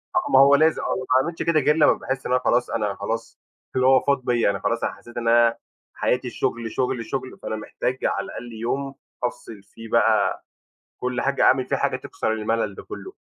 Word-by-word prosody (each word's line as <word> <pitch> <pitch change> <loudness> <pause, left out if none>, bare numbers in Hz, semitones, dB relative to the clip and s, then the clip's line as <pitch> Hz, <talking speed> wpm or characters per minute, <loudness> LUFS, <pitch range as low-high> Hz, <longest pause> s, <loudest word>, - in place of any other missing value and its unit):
آه 355 -5 0
ما - - +7
هو 140 +1 +7
لازم 155 +2 +3
أو - - -1
ما 130 - -4
باعملش 165 +4 -3
كده 165 -2 +3
غير 150 +2 +3
لمّا 155 -2 +5
باحس 135 0 -4
إن - - -3
أنا 125 0 +3
خلاص 120 +1 +2
أنا 105 -4 -1
خلاص 115 +3 -5 0.4
اللي 130 0 +3
هو 130 -1 +6
فاض 140 -2 0
بيّا، 120 -4 +2
أنا 100 - -2
خلاص 115 0 -1
أنا - - -1
حسّيت 120 0 -14
إن 115 - -2
أنا 115 0 +4 0.4
حياتي 125 0 0
الشُغل، 115 -1 -2
شُغل، 125 -3 -1
شُغل، 130 -1 -5
فأنا 110 - -3
محتاج 125 +4 -3
على - - 0
الأقل 120 -1 -8
يوم 135 +5 -3 0.3
أفصِل 115 -4 -5
فيه 115 +3 -12
بقى - - +2 0.5
كل 125 -1 -2
حاجة، 140 0 +1
أعمل 130 - +4
فيه 140 - -1
حاجة 140 -1 0
تكسر 130 -3 -3
المَلَل 110 -1 -1
ده - - -9
كُلّه. 380 - -9
125 Hz, 215 wpm, -23 LUFS, 115-135 Hz, 0.5 s, ما